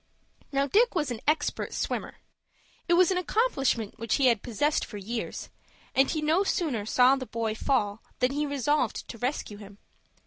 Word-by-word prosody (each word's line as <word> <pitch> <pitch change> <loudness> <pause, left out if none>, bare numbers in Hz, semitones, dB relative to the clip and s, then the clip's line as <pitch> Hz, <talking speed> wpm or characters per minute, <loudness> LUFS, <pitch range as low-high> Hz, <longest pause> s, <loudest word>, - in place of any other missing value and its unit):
Now 275 0 +1
Dick 430 - +3
was 300 -6 0
an 235 -2 -5
expert 305 0 0
swimmer. - - -3 0.7
It 345 - +3
was 360 +1 +5
an 365 - +1
accomplishment 275 - 0
which 230 -1 0
he 275 - +2
had 235 -5 +4
possessed 290 +6 0
for 210 - -7
years, 225 +4 -5 0.4
and 270 +1 +3
he 310 -2 -1
no 320 +6 +3
sooner 275 - -1
saw 250 +3 +5
the 260 -2 -6
boy 225 -1 -2
fall 220 -3 0 0.2
than 250 +1 +1
he 295 +1 -1
resolved 285 -3 0
to 230 - -8
rescue 245 -4 -3
him. 205 -1 -12
270 Hz, 175 wpm, -28 LUFS, 230-300 Hz, 0.7 s, was